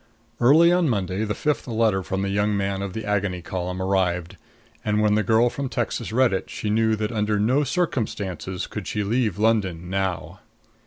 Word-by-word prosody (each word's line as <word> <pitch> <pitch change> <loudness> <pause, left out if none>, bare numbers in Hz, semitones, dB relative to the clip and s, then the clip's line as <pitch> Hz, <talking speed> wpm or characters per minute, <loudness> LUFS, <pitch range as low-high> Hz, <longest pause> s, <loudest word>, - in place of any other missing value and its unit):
Early 155 +8 +6
on 175 -3 +3
Monday 100 -2 -1
the 105 -1 -2
fifth 150 +3 -1
letter 110 -4 +1
from 95 +1 -3
the 100 - -1
young 100 +1 +1
man 100 0 -1
of 100 -2 -4
the 110 -1 -5
Agony 100 -4 -1
Column 90 0 -4
arrived, 95 -2 0 0.5
and 105 0 +1
when 105 -1 +3
the 105 - +3
girl 110 +4 +3
from 140 -2 -4
Texas 120 -4 -3
read 125 -1 +3
it 95 - -3
she 105 - -3
knew 110 0 +2
that 110 +1 -2
under 105 -2 0
no 125 +8 +2
circumstances 105 - -2
could - - -7
she 105 - -1
leave 110 -2 0
London 95 -6 0
now. 95 -2 -2
105 Hz, 190 wpm, -24 LUFS, 95-115 Hz, 0.5 s, Early